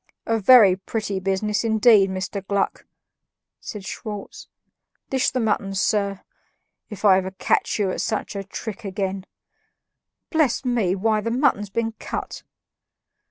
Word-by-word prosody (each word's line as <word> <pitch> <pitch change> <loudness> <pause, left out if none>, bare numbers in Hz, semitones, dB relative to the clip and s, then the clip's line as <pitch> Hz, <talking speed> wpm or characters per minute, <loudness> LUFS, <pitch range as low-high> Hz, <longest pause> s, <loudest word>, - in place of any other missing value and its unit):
"A 225 0 0
very 205 -4 +7
pretty 200 0 -3
business, 195 +3 -1
indeed, 220 -3 +5
Mr. 190 +1 -4
Gluck!" 200 -1 -1 0.7
said 210 -4 -8
Schwartz. 210 -1 -7 0.6
"Dish 265 -1 +2
the 255 - -2
mutton, 210 -3 -1
sir. 200 0 0 0.7
If 210 -1 -6
ever 190 -2 +5
I 190 - -8
catch - - +1
you 200 -3 0
at - - -3
such 215 -1 -3
a 200 - -3
trick 220 +3 -7
again 195 -1 -3 1.0
bless 310 -6 +1
me, 225 -7 +1
why, 215 +2 +1
the 230 - -2
mutton's 230 -5 +1
been 225 +3 -1
cut!" - - -5
205 Hz, 135 wpm, -23 LUFS, 195-225 Hz, 1.0 s, very